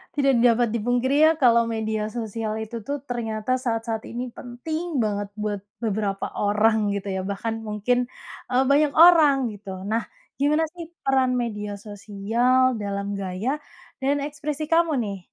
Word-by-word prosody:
Tidak 275 -4 +3
dapat 235 -1 +3
dipungkiri 245 +5 +1
ya, 315 +1 +7
kalau 235 -4 +4
media 220 -1 -2
sosial 220 -1 -4
itu 220 +1 -5
tuh 285 +7 -3
ternyata 225 -2 -3
saat-saat 225 -2 -2
ini 245 0 -5
penting 310 +7 -4
banget 205 -1 -2
buat 210 -2 -2 0.2
beberapa 210 -3 -2
orang 210 +1 +2
gitu 200 -1 -3
ya 190 - -1
bahkan 210 +4 -3
mungkin, 210 +4 0 0.5
eee, 255 +1 +3
banyak 295 +1 +4
orang 325 -4 +8 0.2
gitu 205 -1 -11 0.2
nah, 220 +3 0 0.4
gimana 300 +3 +3
sih 350 -1 -7 0.2
peran 265 -1 +3
media 210 -4 -3
sosial 225 +5 +1
dalam 200 0 -3
gaya, 190 +5 -3 0.5
dan 275 +2 +2
ekspresi 295 0 -4
kamu, 335 0 +4
nih? 200 -2 -5
230 Hz, 145 wpm, -24 LUFS, 210-260 Hz, 0.5 s, orang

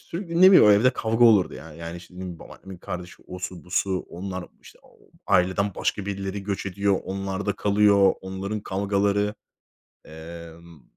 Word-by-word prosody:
sürekli, 170 -1 -4
ne 190 +1 +9
bileyim, 105 - +8
evde 105 +5 +5
kavga 115 0 +1
olurdu 105 -6 +5
yani. 80 0 -11
Yani 85 +1 -7
şimdi 90 0 -9
babaannemin 95 -2 -12
kardeşi, 90 0 -8
osu 90 -1 -7
busu, 95 +1 0
onlar, 95 +1 -6
işte, - - -17 0.5
aileden 95 +1 +2
başka 100 - -2
birileri 100 0 -4
göç 100 -1 -3
ediyor, 100 0 0
onlarda 95 +1 -3
kalıyor, 100 -1 +4
onların 95 +3 -5
kavgaları, 100 +1 0 0.7
emm, 85 0 -12
95 Hz, 135 wpm, -24 LUFS, 90-100 Hz, 0.7 s, ne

